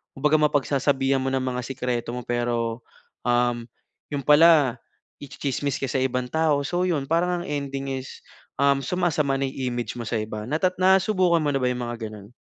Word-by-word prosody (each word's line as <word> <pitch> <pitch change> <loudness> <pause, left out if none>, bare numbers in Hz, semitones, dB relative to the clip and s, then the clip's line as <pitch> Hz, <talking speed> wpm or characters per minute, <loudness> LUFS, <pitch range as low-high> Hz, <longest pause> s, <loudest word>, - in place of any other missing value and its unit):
kumbaga 150 +3 +3
mapagsasabihan 135 -2 +2
mo 135 - -1
ng 130 - +1
mga 125 -1 -2
sikreto 125 -3 -3
mo 125 - -4
pero, 120 -1 -1 0.4
um, 120 -1 +1 0.5
'yon 140 -2 -2
pala, 150 -4 +6 0.5
itsi-tsismis 140 0 -3
ka - - 0
sa 130 - 0
ibang 125 -1 -1
tao, 160 -3 +2
so 175 +5 0
'yon. 150 -6 0
Parang 175 +1 +1
ang - - -9
ending 140 -2 -3
is, 130 - -10 0.4
um, 140 -1 +4
sumasama 155 -4 0
na 135 - 0
'yong - - -12 0.2
image 120 -2 -4
mo - - -3
sa 115 - -2
iba. 110 0 -5
Na 155 - +1
tat 185 -1 +1
nasubukan 185 -3 +4
mo 145 - +1
na 135 - +1
ba 125 - +2
'yong 125 0 -3
mga 120 - -5
gano'n? 105 -1 -11
135 Hz, 190 wpm, -24 LUFS, 125-150 Hz, 0.5 s, pala